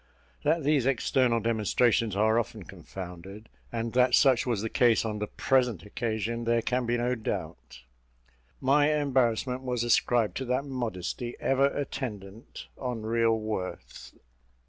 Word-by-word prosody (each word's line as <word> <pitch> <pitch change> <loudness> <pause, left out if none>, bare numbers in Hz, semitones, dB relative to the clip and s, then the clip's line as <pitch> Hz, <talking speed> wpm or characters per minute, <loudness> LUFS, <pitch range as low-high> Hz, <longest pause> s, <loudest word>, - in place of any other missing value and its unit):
That 155 +1 +1
these 140 -3 +2
external 125 -2 +2
demonstrations 115 0 +1
are 110 +3 +3
often 110 -2 -5
confounded, 95 +4 -10 0.2
and 115 -1 -3
that 125 0 +4
such 130 -3 +4
was 115 -4 -1
the - - -1
case 115 -2 +3
on 105 -1 -3
the 105 - -2
present 125 - +1
occasion, 115 +2 -3
there 115 0 +2
can 125 -1 -1
be 120 0 +1
no 120 +1 0
doubt. 90 - -5 0.8
My 145 +3 +3
embarrassment 130 -3 +1
was 125 -2 -2
ascribed 120 -1 +2
to 130 - -3
that 125 +3 -1
modesty 120 -3 -4
ever 135 +1 +3
attendant 115 -7 -6
on 125 -4 -4
real 115 0 +2
worth. 110 -4 -6
115 Hz, 140 wpm, -28 LUFS, 110-130 Hz, 0.8 s, that